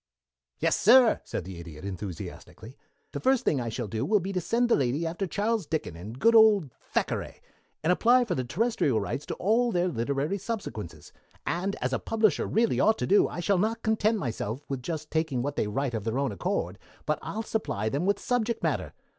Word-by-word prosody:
"Yes, - - +1
sir," 240 +2 +6
said - - -4
the 90 -2 -8
Idiot 85 0 -10
enthusiastically. 100 - -7 0.4
"The - - -4
first 260 -1 +2
thing 140 - +2
I 115 - -3
shall 115 0 -4
do 110 +3 -3
will 210 +8 +3
be 195 +2 -4
to 180 - 0
send 235 +8 +1
the 235 - +4
lady 140 +4 0
after 175 +4 -2
Charles 210 0 -1
Dickens 150 - -3
and 105 +8 -8
good 230 +11 +4
old 210 - +6 0.2
Thackeray, - - -2 0.4
and 170 +3 +4
apply 245 +6 +4
for 195 - -1
the 130 - -1
terrestrial 155 - +1
rights 110 +7 -4
to - - -3
all 235 +5 +2
their 180 -2 +1
literary 140 - -1
subsequences, 110 - -6 0.3
and, 190 +4 -1
as 130 +1 0
a - - +1
publisher 220 -6 +1
really 225 +1 +1
ought 220 0 +4
to - - -1
do, 205 - +4
I 175 - -5
shall 195 +1 +2
not 225 +3 -1
content 220 0 +2
myself 120 - -4
with 135 -2 -4
just 155 +2 -5
taking 160 -6 0
what 145 +1 -3
they - - 0
write 130 +4 -2
of 110 -3 -3
their 115 +3 -2
own 140 -1 0
accord, 100 - -2 0.3
but 150 - 0
I'll 220 +2 -4
supply 155 - -2
them 140 - -1
with 200 0 +3
subject 235 -2 -1
matter. - - -1
165 Hz, 205 wpm, -28 LUFS, -, 0.4 s, sir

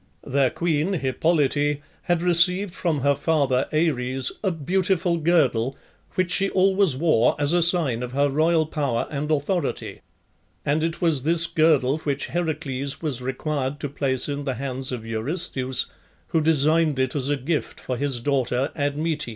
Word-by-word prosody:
Their 135 -1 +1
queen, 165 +4 -1
Hippolyte, 145 -1 0 0.2
had 175 -1 -1
received 180 +2 +3
from 160 -5 -2
her 140 +1 +3
father, 140 -3 0
Ares, 135 -5 +1
a 195 - +2
beautiful 180 +1 0
girdle, 140 -7 +1 0.4
which 185 -1 0
she 195 +2 +2
always 190 -4 +3
wore 150 -7 +2
as 145 +2 +2
a 175 - +3
sign 165 -9 +4
of 125 0 -5
her 140 +1 +2
royal 160 +3 +2
power 140 -6 -2
and 150 +1 -3
authority, 155 +4 -2 0.6
and 150 +2 +1
it 165 0 -3
was 160 -6 +2
this 165 +4 +4
girdle 155 -4 +2
which 140 -3 -3
Heracles 145 -5 -3
was 135 -6 -1
required 135 +2 -3
to 145 - -3
place 135 -2 0
in 145 0 -4
the 135 -2 -3
hands 130 +1 -4
of 120 -3 -5
Eurystheus, 130 +2 0 0.4
who 160 - +1
designed 155 0 +3
it 130 0 -1
as 140 -1 0
a 145 - +1
gift 150 +4 -3
for 125 - -4
his 135 -1 -2
daughter 130 0 0
Admete. 150 0 -2
145 Hz, 160 wpm, -23 LUFS, 135-165 Hz, 0.6 s, sign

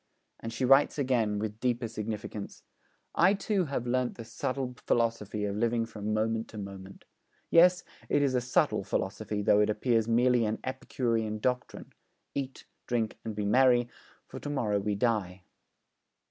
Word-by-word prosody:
And 115 - -6
she 115 +3 -1
writes 135 +4 +5
again, 120 -7 +1
with 105 +1 -4
deeper 120 -1 0
significance: 110 -1 -6 0.5
'I 185 +4 +4
too 195 -2 0
have 135 -4 -3
learnt 125 0 0
the 115 - -8
subtle 130 +2 -3
philosophy 110 -3 0
of 100 -1 -2
living 115 +1 +1
from 105 -2 -5
moment 110 +1 0
to 110 - -11
moment. 100 -1 -9 0.5
Yes, 180 +1 +6 0.3
it 145 - +3
is 135 -2 +1
a 125 - +2
subtle 125 +1 +1
philosophy 105 -1 -2
though 105 - +5
it 105 - +3
appears 115 +1 +1
merely 120 +1 +3
an 110 0 -1
epicurean 115 -4 -2
doctrine: 125 +3 -3 0.4
"Eat, 135 -1 -5 0.2
drink, 115 -3 -1
and 110 -2 -5
be 105 -1 -2
merry, 120 +2 +4 0.4
for - - -9
to 145 - -6
morrow 110 -8 0
we 105 +1 -1
die." 100 -5 -1
115 Hz, 160 wpm, -29 LUFS, 105-125 Hz, 0.5 s, Yes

